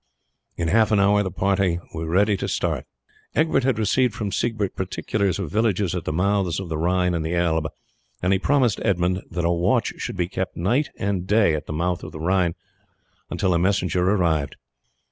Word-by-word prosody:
In 85 -1 -1
half 110 +3 +3
an 105 - +4
hour 100 +1 +4
the 95 - -2
party 95 -1 +1
were 80 0 -4
ready 100 +5 +3
to - - -3
start. - - -1 0.5
Egbert 155 -3 +2
had 130 -4 +1
received 115 +1 +1
from 105 -3 -3
Siegbert 110 -4 -1
particulars 95 +1 -1
of 95 -7 -4
villages 105 -4 +1
at 90 - -4
the - - -1
mouths 95 0 +1
of 95 -3 -6
the 80 - -2
Rhine 90 +1 +1
and 85 -2 -1
Elbe, 80 -2 +1 0.5
and 90 +2 +1
he 95 - +2
promised 130 -1 +2
Edmund 90 -2 +1
that 85 0 -2
a 85 - +3
watch 85 0 +1
should - - -5
be 90 - 0
kept 95 0 -4
night 120 - +1
and 95 -2 -2
day 105 -5 +4
at 75 0 -3
the - - -4
mouth 85 +3 -1
of - - -8
the 80 - -7
Rhine 90 0 +1 0.7
until 90 +1 0
a 85 - +2
messenger 95 0 +1
arrived. 80 -8 +1
95 Hz, 195 wpm, -23 LUFS, 85-100 Hz, 0.7 s, an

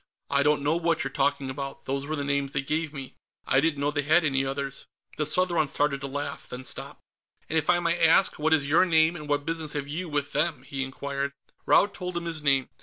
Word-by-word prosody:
"I 140 0 +4
don't 150 0 +2
know 150 +3 +2
what 170 -1 0
you're - - -4
talking 140 -1 0
about. 135 0 -7
Those 135 +1 -3
were 155 - -2
the 145 - -3
names 140 -1 -1
they 140 - +1
gave 155 +2 -1
me; 140 -3 -8 0.3
I 135 - +3
didn't 145 0 +1
know 145 +1 +1
they 145 - 0
had 155 +4 +3
any 135 -2 +1
others." 135 0 -4 0.3
The 150 - +2
Southron 170 -2 +2
started 140 0 0
to 140 - -3
laugh, 140 +1 -5
then 125 +1 -7
stopped. - - -5 0.5
"And - - -4
if 160 -1 +1
I 175 - +5
may 170 0 0
ask, 165 +3 +4
what 155 +1 +1
is 155 -3 +4
your 150 +6 +4
name, 160 -1 +3
and 150 -3 -8
what 145 0 0
business 165 -2 -3
have 145 -1 -3
you 165 +4 -4
with 145 -1 -1
them?" 150 -2 0
he 135 0 -4
inquired. 140 +1 -4 0.3
Raud 205 - +4
told 180 -1 -5
him 170 - -4
his 165 -2 -3
name. 135 -3 +2
145 Hz, 240 wpm, -26 LUFS, 140-160 Hz, 0.5 s, I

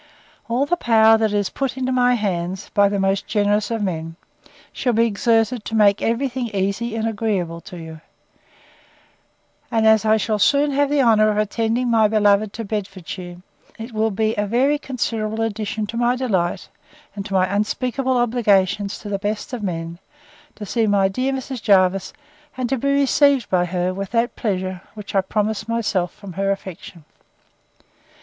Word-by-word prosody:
All 245 +4 +1
the 350 +4 0
power 225 -5 +5
that 220 -1 +1
is 205 -2 0
put 270 -1 -3
into 260 0 -1
my 250 -1 +3
hands, 190 -3 -3
by 200 -1 +4
the 200 0 -1
most 195 0 0
generous 205 0 +1
of 225 -2 -2
men, 165 -3 -3 0.6
shall 245 -2 0
be 230 +1 +3
exerted 225 +1 +1
to 225 - -4
make 205 -2 +4
every 235 +4 0
thing 250 -1 -4
easy 200 +4 -1
and 225 0 -1
agreeable 200 -7 -2
to 180 - -10
you: 160 -1 -9 1.7
And 225 -2 +1
as 220 -1 +5
I 220 0 +3
shall 215 0 -1
soon 285 +7 +3
have 285 +1 +1
the 290 -2 +2
honour 215 -2 +4
of 210 - -1
attending 225 +3 0
my 220 -2 +4
beloved 210 -1 +2
to 230 - -5
Bedfordshire, 190 -3 -6 0.3
it 225 +2 -8
will 220 +1 +1
be 215 +1 0
a 205 0 0
very 270 +7 +2
considerable 225 -4 -2
addition 215 -1 -3
to 230 +3 -6
my 240 +1 +2
delight, 195 -9 -1 0.5
and 200 - -4
to 195 - -3
my 185 -1 +4
unspeakable 250 +6 -1
obligations 205 -4 +1
to - - -10
the 200 -1 -2
best 210 +4 -4
of 245 - -4
men, 170 -3 -4 0.6
to 210 - -7
see 225 +2 0
my 200 -2 +3
dear 255 +7 -1
Mrs. 265 -2 -5
Jervis, 195 -2 +3 0.5
and 255 -1 -1
to 270 - 0
be 280 +3 0
received 280 -2 +3
by 180 -1 +3
her 180 +1 -1
with 195 0 -5
that 235 0 +1
pleasure, 185 -4 -3
which 210 -2 -8
I 195 - +3
promise 215 +2 -2
myself 210 -6 -1
from 200 -3 -11
her 195 +2 -1
affection. 185 -4 -7
215 Hz, 175 wpm, -21 LUFS, 195-235 Hz, 1.7 s, power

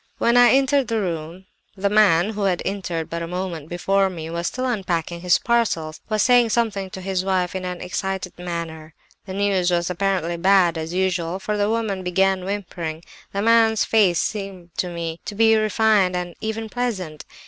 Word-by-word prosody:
When 235 - +2
I 245 0 +7
entered 270 0 +3
the 225 -2 0
room, 170 -1 -4 0.3
the 195 +1 0
man, 200 -2 +4
who 205 -2 -2
had 185 -2 0
entered 180 -5 -3
but 170 0 -4
a 165 - -4
moment 175 -3 -5
before 195 +2 +1
me, 165 -4 -7
and 165 - -7
was 170 0 -2
still 255 0 -3
unpacking 175 -8 -2
his 180 -1 +4
parcels, 195 -10 0
was 215 -2 +2
saying 245 -2 +5
something 210 -4 0
to 190 - -8
his 185 -1 -1
wife 185 -2 0
in 185 -1 -4
an 180 -1 -5
excited 185 +1 -3
manner. 165 -3 -6 0.3
The 190 - -5
news 195 -3 +1
was 175 0 0
apparently 180 -2 -1
bad, 185 -1 +4
as 160 0 -4
usual, 180 -1 -1
for 210 +2 -3
the 205 0 +1
woman 220 -4 -1
began 185 +1 +1
whimpering. 170 -5 -4 0.3
The 200 +1 -2
man's 225 -1 +4
face 200 -6 +3
seemed 195 -4 -4
to 180 - 0
me 170 -1 -5
to 205 - -6
be 225 +1 +5
refined 215 -3 +2
and 175 -1 -3
even 220 0 -3
pleasant. 200 -10 -3
190 Hz, 190 wpm, -22 LUFS, 175-210 Hz, 0.3 s, I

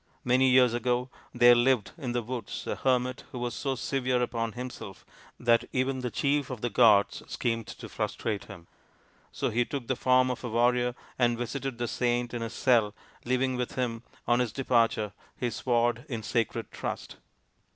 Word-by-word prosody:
" - - -37
Many 130 +2 +4
years 125 -2 +5
ago 125 +1 0 0.2
there 120 0 +7
lived 120 -2 +2
in 135 -7 -4
the 120 -1 -1
woods 120 +1 -5
a - - -2
hermit 125 -1 0
who - - -7
was 120 -1 -2
so 135 +1 -2
severe 130 0 0
upon 115 -2 -1
himself 120 -5 -8 0.3
that 120 -1 +3
even 130 0 0
the 125 -1 -2
chief 140 +3 0
of 125 -4 -6
the 120 - -1
gods 105 -4 +4
schemed 115 -2 -2
to - - -8
frustrate 105 -3 -3
him. 90 -4 -11 0.7
So - - -2
he 120 +2 +2
took 135 0 -5
the 130 - -1
form 130 0 +3
of 125 - -6
a 120 - -3
warrior 120 +1 +2 0.2
and 120 -1 +3
visited 130 +1 -4
the 120 0 -2
saint 120 0 0
in 120 - -3
his 115 0 -4
cell, 115 -6 +2 0.3
leaving 130 +1 +1
with 125 -1 -3
him, 120 -3 -2 0.3
on 120 +1 +3
his 125 -3 0
departure, 115 -4 +1 0.2
his 120 -2 -2
sword 120 -1 +1
in 115 -4 -4
sacred 115 -1 -1
trust. - - -5
120 Hz, 180 wpm, -28 LUFS, 115-130 Hz, 0.7 s, there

